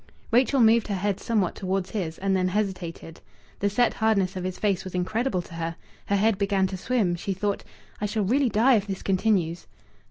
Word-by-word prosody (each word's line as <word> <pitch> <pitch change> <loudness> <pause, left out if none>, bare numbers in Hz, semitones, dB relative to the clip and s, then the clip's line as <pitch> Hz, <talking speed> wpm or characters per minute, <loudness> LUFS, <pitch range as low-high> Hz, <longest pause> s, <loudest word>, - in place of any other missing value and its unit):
Rachel 255 +3 +4
moved 225 0 +5
her 205 - -1
head 195 +1 -1
somewhat 210 -6 0
towards 190 -1 -2
his, 170 -7 -3
and 195 0 0
then 185 -1 +1
hesitated. 185 -4 -3 0.4
The 200 - +1
set 235 +4 +2
hardness 200 -4 +1
of 185 - -4
his 185 0 -3
face 200 -3 0
was 185 -1 -7
incredible 190 +2 -1
to 170 - -14
her. 165 0 -3 0.3
Her 200 - +2
head 205 0 +2
began 200 -1 +2
to 190 0 -3
swim. 210 -3 0
She 195 +3 -3
thought, 200 +2 -2 0.4
"I 210 - 0
shall 210 0 -1
really 255 +6 +2
die 230 +3 +4
if 205 0 -3
this 195 -1 -5
continues." 185 -4 0
195 Hz, 200 wpm, -26 LUFS, 185-220 Hz, 0.4 s, moved